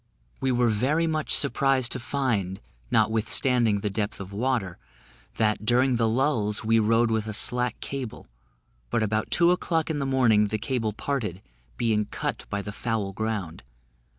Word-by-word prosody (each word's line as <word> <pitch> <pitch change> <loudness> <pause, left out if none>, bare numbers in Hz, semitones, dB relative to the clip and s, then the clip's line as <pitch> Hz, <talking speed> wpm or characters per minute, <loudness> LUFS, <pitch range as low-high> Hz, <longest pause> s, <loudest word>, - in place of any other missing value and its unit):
We 135 -1 0
were 120 -1 +2
very 135 +10 +1
much 155 -2 -2
surprised 135 -3 +4
to 125 - -2
find, 115 -8 -2 0.3
notwithstanding 115 -1 +2
the 105 - -2
depth 105 0 -3
of 100 0 -8
water, 110 -5 -2 0.6
that, 105 -1 +1
during 125 +3 +3
the 115 -1 +2
lulls, 115 -5 0
we 115 +1 +3
rode 115 +2 +2
with 110 -1 -1
a 110 - -3
slack 125 +1 +1
cable; 135 -5 -6 0.6
but 115 - 0
about 110 0 -1
two 170 0 +4
o'clock 165 -3 0
in 150 - -2
the 135 - -2
morning 115 -6 +3
the 110 +1 -2
cable 115 -1 -2
parted, 105 -5 -4 0.3
being 110 -3 +1
cut - - -4
by 100 -1 -3
the 105 - -6
foul 110 -4 -3
ground. 105 -6 -4
115 Hz, 160 wpm, -25 LUFS, 105-130 Hz, 0.6 s, surprised